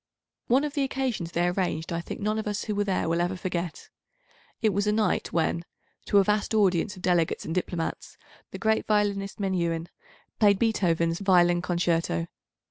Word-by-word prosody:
One 260 +4 +3
of 295 -1 -3
the 290 - 0
occasions 260 -10 -2
they 170 +1 +1
arranged 175 -3 -1
I 170 - -1
think - - -7
none 215 +1 0
of 215 - -4
us 205 -1 -2
who 215 - -2
were 205 0 +1
there 195 -4 -1
will 165 +1 +1
ever 175 +2 0
forget. 180 -2 -4 0.7
It 220 - +3
was 200 +2 0
a - - +4
night 215 0 0
when, 170 0 0 0.4
to 205 - +3
a 200 - +7
vast 210 +2 0
audience 195 -1 +2
of 185 - -13
delegates 175 -3 +1
and 160 - -3
diplomats, 175 -2 -3 0.3
the - - -7
great 220 0 +1
violinist 205 -2 0
Menuhin 170 -4 -1 0.5
played 205 -2 +5
Beethoven's 170 -7 +1
Violin 175 -3 +4
Concerto. 170 - 0
185 Hz, 180 wpm, -27 LUFS, 170-210 Hz, 0.7 s, a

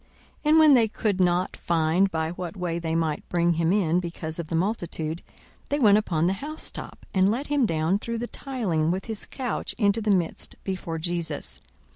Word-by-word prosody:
42:005:019 - - -33 0.4
And 315 - +6
when 310 -2 +8
they 235 -4 +5
could 210 -2 -1
not 180 0 +2
find 170 +3 +2
by 160 -2 -2
what 175 +1 -6
way 175 -2 -2
they 165 -1 -2
might 160 -2 -1
bring 170 0 +2
him 165 +1 +1
in 180 -4 +2
because 170 -2 -5
of 170 - -4
the 165 - -2
multitude, 170 -4 -2 0.5
they 285 - +1
went 210 -6 +6
upon 170 -6 0
the 185 - +2
housetop, 310 +2 -3
and 190 0 +4
let 245 +7 -1
him 275 -5 +3
down 165 +4 +1
through 230 +2 -4
the 235 - -2
tiling 210 - -2
with 185 +3 -1
his 220 -3 -5
couch 255 -3 -4
into 205 0 +2
the 215 - -1
midst 180 -5 0
before 185 -4 -3
Jesus. 165 -2 -3
180 Hz, 195 wpm, -26 LUFS, 165-215 Hz, 0.5 s, when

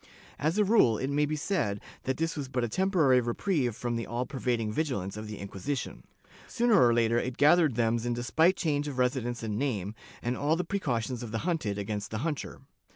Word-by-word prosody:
As 155 +6 0
a 210 - +5
rule 195 - +4
it 130 +4 -2
may 145 +1 +2
be 155 - -1
said 150 - -1 0.3
that 130 0 -1
this 165 0 -1
was 145 -3 -4
but 125 -2 -2
a - - +1
temporary 155 - +3
reprieve 125 - 0
from 120 0 -3
the 115 - -4
all 120 +2 -2
pervading 120 -4 -1
vigilance 105 - -2
of 105 0 -6
the 105 -1 -6
Inquisition. 100 +7 -4 0.5
Sooner 235 - +4
or 120 - +5
later, 115 0 +3
it 125 0 -4
gathered 150 -2 +5
thems 115 0 +1
in 120 0 -1
despite 160 +9 +3
change 150 -4 -1
of 140 -3 -5
residence 125 -2 0
and 105 -1 -2
name, 105 -8 -2 0.3
and 120 +1 -1
all 150 +4 +1
the 180 - -1
precautions 130 - -2
of 120 - -6
the 115 - -2
hunted 155 - -1
against 105 0 -3
the 110 - -3
hunter. 155 -4 -4
125 Hz, 210 wpm, -29 LUFS, 115-155 Hz, 0.5 s, a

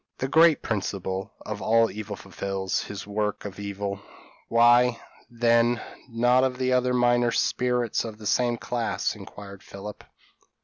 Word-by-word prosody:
p> - - -2
"The 135 - -5
great 165 -1 +5
principle 95 -3 -3
of 105 -1 -5
all 115 +3 +3
evil 105 -1 -6
fulfils 95 -1 -3
his 100 -1 -7
work 105 0 -2
of 100 -1 -7
evil; 100 -1 -4 0.5
why, 120 +1 +5 0.3
then, 120 0 +3 0.3
not 125 +2 +2
the 130 0 0
other 125 0 +2
minor 120 -1 +3
spirits 125 -1 0
of 110 -2 -7
the 110 - -11
same 120 +2 +1
class?" 115 -6 -2
inquired 100 -1 -11
Philip. 100 +1 -9
115 Hz, 140 wpm, -26 LUFS, 100-120 Hz, 0.5 s, great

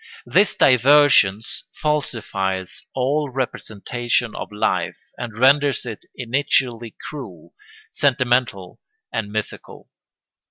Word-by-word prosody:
] - - -24
This 205 - +5
divergence 130 -5 +4
falsifies 100 -11 -2
all 140 +3 0
representation 120 -2 -2
of - - -6
life 105 - -1 0.2
and 115 -3 -7
renders 140 +2 +4
it 115 -4 -7
initially 120 -2 -1
cruel, 110 - -9 0.4
sentimental, 125 -8 0 0.3
and 105 -2 -3
mythical. 110 0 -6
125 Hz, 90 wpm, -21 LUFS, 110-135 Hz, 0.4 s, This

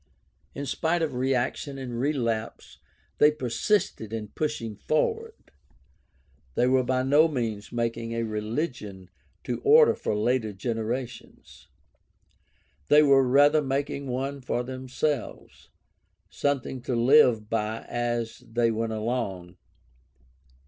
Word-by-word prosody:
In 140 - -4
spite 165 +5 0
of 155 - -2
reaction 130 +2 -1
and 125 -3 -5
relapse 115 -5 -2 0.4
they 150 - +7
persisted 130 - -1
in 110 -2 -5
pushing 115 -8 -3
forward. 450 - -2 1.0
They 120 - +3
were 130 +1 +3
by 130 0 0
no 145 +5 +5
means 115 -8 -4
making 115 -1 -2
a 115 0 -1
religion 105 - -4 0.3
to - - -4
order 455 +2 +7
for - - -3
later 110 0 0
generations; 115 +3 -5 1.2
they 150 +1 +6
were 140 -2 +5
rather 145 +4 +5
making 140 0 -2
one 135 +2 -3
for 125 -1 -2
themselves, 130 +1 -4 0.6
something 130 +4 -2
to 125 +1 -2
live 120 -3 +5
by 110 0 -2
as 120 -1 -2
they 115 0 0
went 115 0 -2
along. 105 -6 -3
125 Hz, 115 wpm, -26 LUFS, 115-140 Hz, 1.2 s, they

